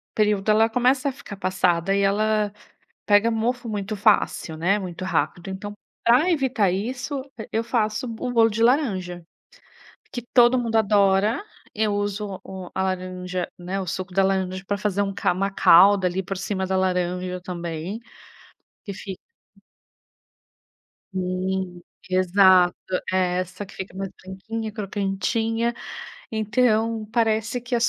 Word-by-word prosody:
período, 210 -1 +1
ela 220 +1 +5
começa 255 +4 +2
a - - -3
ficar 255 -6 -10
passada, 185 -1 +1
e 200 - +2
ela 210 +1 +1 0.5
pega 205 +2 +4
mofo 235 +2 -1
muito 210 -1 -3
fácil, 200 -5 +2
né, 180 +6 +1
muito 185 -2 -6
rápido. 175 +1 -1
Então, 205 +2 -6 0.3
pra 250 +9 +4
evitar 260 - +2
isso, 250 +8 -3 0.2
e 220 - -7
eu 225 - +1
faço 225 0 0
o 230 +2 -4
bolo 230 -2 +5
de 225 +1 0
laranja, 195 - +1 0.9
que 245 - -3
todo 245 0 +6
mundo 230 -2 -1
adora. 205 - +3 0.3
Eu 215 -1 +1
uso 205 -1 -3
o 190 -2 -8
a - - 0
laranja, 185 -1 -3
né, 180 +2 -3
o 190 - -4
suco 185 +2 -4
da 195 +2 +3
laranja 190 -1 0
pra 205 - 0
fazer 200 -1 -1
um 195 -1 -2
ca - - +1
uma 195 +2 -1
calda 195 +1 +6
ali 180 +1 -1
por 195 +1 -5
cima 190 0 -2
da 190 0 0
laranja 180 -1 -1
também, 175 +2 -5 0.9
que 200 - -6
fi 190 -1 -7 2.0
Sim, 185 -1 -2 0.3
exato. 185 -1 +5 0.4
É 180 -1 +1
essa 185 +2 -5
que - - -15
fica 190 -1 -7
mais 195 0 -4
branquinha, 215 +4 -5
crocantinha. 215 +3 -1 0.6
Então 220 0 +1
parece 225 0 +1
que 245 +1 -4
as 235 0 +3
200 Hz, 145 wpm, -24 LUFS, 185-225 Hz, 2.0 s, todo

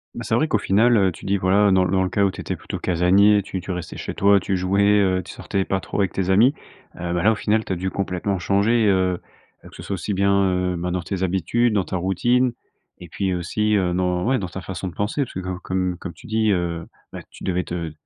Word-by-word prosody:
Bah 115 - -5
c'est 110 +2 0
vrai 155 +6 +2
qu'au - - +2
final, 115 +5 +3
heu, 95 -2 +3
tu - - -13
dis, 100 +1 +1
voilà, 95 +2 +3
dans 95 -1 +4
le 90 - -1
dans 95 -1 +2
le 95 - -1
cas 100 - +1
où 100 - +2
tu - - -12
étais - - -3
plutôt - - -7
casanier, 95 +4 +3
tu 95 - -5
tu 95 - -6
restais 90 -2 -6
chez - - -5
toi, 100 0 +4
tu 95 0 -1
jouais, 95 +2 +1 0.2
heu, 95 -2 +2
tu - - -10
sortais 95 -1 -2
pas 95 - -1
trop 100 - -5
avec 95 -4 +1
tes 95 -1 -1
amis, 110 +8 +5 0.5
heu, 85 0 -3
bah 85 0 -1
là, 110 - +5
au - - -3
final, 110 +1 0
tu 95 - -2
as - - -1
dû 95 +2 -3
complètement 95 0 -2
changer, 105 +5 +2
heu, 95 -2 +2 0.5
heu, - - -11
que - - -16
ce - - -9
soit - - -4
aussi 95 +4 -3
bien, 100 +1 +2 0.2
heu, 90 0 0
bah 90 +1 -3
dans 90 0 -1
tes 95 +2 -4
habitudes, 95 +6 +1
dans 100 -3 +2
ta 95 - -4
routine 120 +8 +1 0.5
et 90 -2 -11
puis 95 0 -2
aussi, 105 +5 0
heu, 90 -3 +1
dans 90 0 0
ouais, 130 +2 +2
dans 90 - -4
ta 95 +2 -7
façon 95 0 -5
de 90 - -7
penser. 105 +8 -1
Puisque 95 -6 -6
comme 95 0 -4
comme 90 -1 -2
comme 90 - -7
tu - - -17
dis, 110 0 +1
heu, 85 -3 -2 0.2
bah, - - -7
tu - - -14
devais 90 -1 0
te 85 -2 -5
95 Hz, 270 wpm, -22 LUFS, 90-100 Hz, 0.5 s, amis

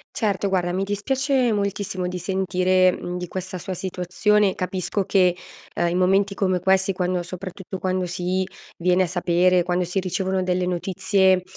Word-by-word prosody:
Certo, 200 -2 0
guarda 175 -2 0
mi 190 +2 -1
dispiace 255 +5 0
moltissimo 200 -2 -2
di 180 0 -4
sentire, 185 0 +2
mhmm, 180 0 -5
di 180 -1 -5
questa 185 0 -5
sua 185 +2 -5
situazione. 190 +3 +1
Capisco 185 +2 -2
che, 180 -2 +3 0.4
ehm, 175 - +1
in 180 - 0
momenti 195 +2 +2
come 185 -2 +1
questi 190 +2 +2
quando 180 -1 -1
soprattutto 185 +1 -7
quando 185 -1 -1
si 180 +1 -1 0.3
viene 180 +1 +3
a - - -1
sapere 180 0 +2
quando 180 +1 0
si 180 +3 -1
ricevono 185 +1 -1
delle 180 0 0
notizie, 190 +1 +2
185 Hz, 160 wpm, -23 LUFS, 180-195 Hz, 0.4 s, che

